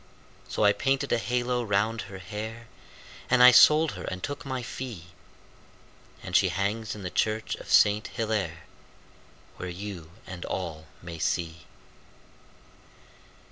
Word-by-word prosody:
So - - -1
I 105 0 +6
painted 135 +6 0
a 120 - +2
halo 125 +1 0
round 110 +2 0
her 95 - -8
hair, 110 +5 -7 0.6
And 125 -1 +5
I 125 - +11
sold 155 +3 +7
her 90 -2 -8
and 90 0 -5
took 145 0 -4
my 130 -2 -3
fee, 115 -9 -7 1.1
And - - -5
she - - +5
hangs 105 +3 -2
in 105 - -9
the 90 - -4
church 110 0 0
of - - -9
Saint 105 +1 +5
Hillaire, 105 -8 -2 0.9
Where 90 - -5
you 90 -3 -7 0.2
and 90 -1 -8
all 80 -4 -5 0.2
may 85 -2 -8
see. 80 -2 -2
105 Hz, 140 wpm, -27 LUFS, 90-120 Hz, 1.1 s, I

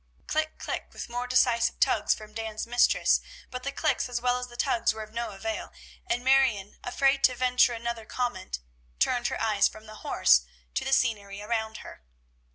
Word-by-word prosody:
"Klick! 310 0 -1
Klick!" - - -4
with - - -7
more 245 +1 -3
decisive 245 -2 +2
tugs - - +3
from 215 0 -12
Dan's 220 -1 -4
mistress; 240 +1 +3 0.3
but 250 0 -5
the 280 - -3
"Klicks," 305 -3 0
as 245 -1 -1
well 250 +1 +1
as 250 - -5
the 240 -1 -13
tugs, 235 - +2
were 220 - -5
of 215 0 -14
no 235 0 -2
avail, 215 +2 -5 0.4
and 245 -9 -1
Marion, 260 -7 +3
afraid 270 +2 +2
to 255 - +3
venture 250 -1 +3
another 235 -1 -4
comment, 240 - -3 0.4
turned 240 - +2
her - - -3
eyes 215 -3 +3
from 215 0 -11
the 215 0 -11
horse 65 - +4 0.3
to - - -1
the - - -3
scenery 205 -6 +1
around 220 0 -2
her. - - -11
235 Hz, 185 wpm, -28 LUFS, 215-250 Hz, 0.4 s, horse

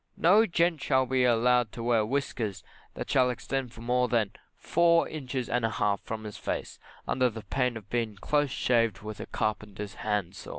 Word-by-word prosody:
No 205 +7 +5
gent 170 -2 +1
shall 130 -2 +2
be 130 0 +2
allowed 120 -1 +3
to 115 - -6
wear 115 -2 +3
whiskers 115 -4 -2 0.3
that - - -5
shall 130 -1 +3
extend 125 +1 -3
more 125 +2 +1
than 115 -5 +1 0.3
four 170 -1 +3
inches 130 -4 -4
and 125 -1 0
a 115 - +2
half 105 -2 0
from 110 -1 -6
his 105 -1 -7
face - - -4 0.3
under 125 -1 +2
the 110 -1 -8
pain 125 -3 -1
of 105 -3 -11
being 115 -3 -1
close 145 +8 +1
shaved 115 -6 +1
with 105 0 -7
a - - -6
carpenter's 105 -1 -3
hand 105 -4 -1
saw. - - -9
120 Hz, 185 wpm, -28 LUFS, 110-130 Hz, 0.3 s, No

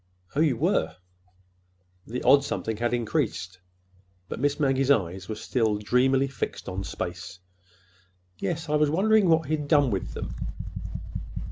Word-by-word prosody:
"Oh, - - +1
you 150 -6 +3
were!" - - +1 1.1
The 125 +3 -4
odd 140 +2 +6
something 110 -5 -3
had 120 +2 0
increased, 115 - -1 0.7
but - - -5
Miss 145 +2 +1
Maggie's 135 -2 +2
eyes 95 -7 +1
were 110 - -2
still 110 -1 0
dreamily 130 +5 +2
fixed 135 - -5
on 95 +1 -3
space. 90 0 -5 1.0
"Yes. 165 -2 -2
I 150 0 +2
was 150 -1 +3
wondering 200 +4 +4
what 160 -1 +4
he 155 +1 +1
had 150 -1 -5
done 145 -4 +4
with 95 -12 -3
them." - - -5
130 Hz, 145 wpm, -26 LUFS, 105-150 Hz, 1.1 s, odd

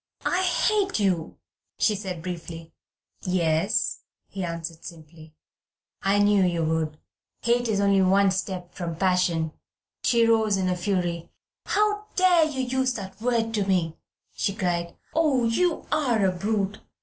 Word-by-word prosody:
"I 360 - +1
hate 390 - +1
you," 185 -5 0 0.4
she 215 - +3
said 190 -5 -5
briefly. 165 -2 -7 0.5
"Yes," 185 +3 +1 0.3
he 195 - -5
answered 165 -1 -5
simply, 160 -1 -12 0.7
"I 195 +1 +2
knew 205 -1 +4
you 170 -2 +1
would. 160 -1 -1 0.5
Hate 240 +1 +2
is 210 -3 0
only 200 -1 +3
one 195 +1 +4
step 185 -1 -4
from 170 -2 -4
passion." 180 -3 +1 0.5
She 235 -1 +4
rose 220 -3 +3
in 190 -1 0
a 180 - +1
fury. 175 -2 -2 0.4
"How 420 0 +1
dare 360 -3 +5
you 285 -4 -3
use 260 0 0
that 195 0 -8
word 230 -2 0
to 205 -3 0
me!" 170 -4 +1 0.4
she 200 - -1
cried. 175 -4 -2 0.2
"Oh, 300 -6 +2
you 330 +10 +1
are 250 -9 +2
a 190 - +3
brute! 200 +2 -2
195 Hz, 145 wpm, -25 LUFS, 175-230 Hz, 0.7 s, dare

